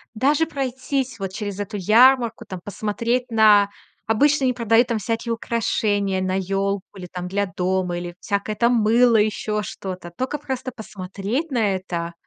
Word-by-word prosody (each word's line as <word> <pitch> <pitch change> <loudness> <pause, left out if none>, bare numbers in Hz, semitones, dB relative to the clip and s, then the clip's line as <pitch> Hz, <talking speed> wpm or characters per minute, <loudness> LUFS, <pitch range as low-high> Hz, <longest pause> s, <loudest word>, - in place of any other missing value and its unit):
Даже 285 +7 +2
пройтись 260 -3 -3
вот 195 -1 -4
через 205 0 -5
эту 205 +1 -4
ярмарку, 235 +4 +4
там, 185 - -6
посмотреть 230 +5 -2
на 215 -3 +5 0.4
обычно 275 +6 +3
они 255 - +2
продают, 235 0 +3
там, 235 - 0
всякие 225 +3 -2
украшения 205 -4 0
на 185 0 -1
ёлку 195 +1 -2
или, 185 - -7
там, 180 -1 -5
для 200 +2 0
дома, 180 -1 -1
или 175 0 -7
всякое, 205 +1 -2
там, 235 +3 +3
мыло, 230 +1 +4
ещё 210 0 0
что-то. 185 -4 -7
Только 260 +3 -2
просто 265 -2 -4
посмотреть 205 - -4
на 215 -6 +1
это, 170 -2 -4
215 Hz, 155 wpm, -22 LUFS, 195-240 Hz, 0.4 s, на